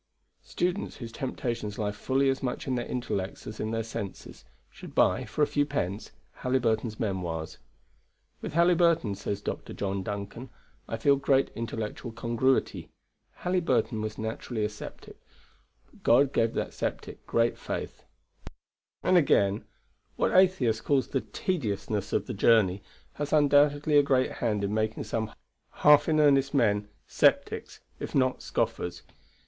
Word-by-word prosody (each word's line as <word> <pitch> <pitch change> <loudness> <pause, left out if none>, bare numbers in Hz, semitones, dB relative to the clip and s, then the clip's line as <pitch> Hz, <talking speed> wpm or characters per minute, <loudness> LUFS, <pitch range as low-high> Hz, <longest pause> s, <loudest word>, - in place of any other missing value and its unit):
Students, 180 +2 -2
whose 115 -4 -7
temptations 115 -4 -4
lie 105 -2 -1
fully 135 +6 0
as 135 - -1
much 125 -2 -3
in 130 - -1
their 120 -1 -2
intellects 100 -6 -3
as 110 - -8
in 110 - -2
their 115 0 -1
senses, 100 -3 -7 0.3
should - - -12
buy - - +3
(for 150 - 0
a - - +6
few 145 0 +1
pence) 105 -9 -3 0.3
Halyburton's 115 -3 0
Memoirs. 85 -6 -3 0.8
"With - - -5
Halyburton," 170 - +3
says 100 +1 -4
Dr. - - -5
John 100 -1 -2
Duncan, 100 +6 -6 0.4
"I 115 - -3
feel 140 +5 +4
great 135 0 +2
intellectual 115 +1 -5
congruity. 115 +3 0 0.5
Halyburton 135 -12 +1
was 110 0 -4
naturally 110 0 -3
a - - -1
sceptic, 105 - -11 0.7
but - - -21
God 135 +4 +4
gave 115 0 +1
that - - -2
sceptic - - -4
great 115 0 +2
faith." - - -5 1.0
Then 185 - +3
again, 105 - +3 0.5
what - - +1
Atheist 160 -13 +3
calls 140 -3 +1
the 135 - 0
"tediousness" 105 - -2
of - - 0
the 125 - -5
journey 100 -3 +3 0.3
has 145 0 -4
undoubtedly 145 0 +4
a - - +7
great 135 -2 +2
hand 105 -4 -1
in 100 +1 -1
making 110 0 -1
some 110 -1 -3 0.5
half 150 +1 +7
in 155 -1 +3
earnest 140 -1 +4
men 105 -5 +2 0.2
sceptics, - - +1 0.2
if - - -5
not 130 -2 +2
scoffers. 85 0 -2
115 Hz, 145 wpm, -28 LUFS, 105-140 Hz, 1.0 s, a